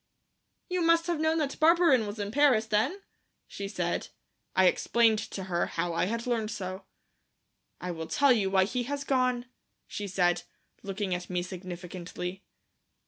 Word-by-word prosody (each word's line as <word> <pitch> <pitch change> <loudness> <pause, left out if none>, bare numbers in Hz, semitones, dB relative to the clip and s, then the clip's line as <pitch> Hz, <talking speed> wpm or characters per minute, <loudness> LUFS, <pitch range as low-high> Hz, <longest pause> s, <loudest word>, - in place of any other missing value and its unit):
"You 365 -1 -1
must 335 0 +4
have 345 -3 -1
known 315 +1 +2
that 290 -3 -2
Barberin 320 -8 +5
was 205 +2 -6
in 205 -1 -3
Paris, 265 -4 +4
then?" 240 - 0 0.4
she 200 - -6
said. 180 -4 -2 0.5
I 190 - +5
explained 225 +4 +3
to 205 -3 -5
her 175 -2 -1
how 175 -1 -2
I 165 - +1
had 230 +4 -3
learned 230 -3 0
so. 190 -3 -5 0.9
"I 180 - -4
will 160 -1 -5
tell 280 - +4
you 205 -5 +1
why 190 0 +4
he 245 +6 -1
has 285 +2 -3
gone," 255 -3 +1 0.4
she 205 - -5
said, 175 -2 +2 0.4
looking 195 -1 -3
at 180 0 -4
me 180 -1 -1
significantly. 180 0 -7
210 Hz, 160 wpm, -29 LUFS, 185-260 Hz, 0.9 s, Barberin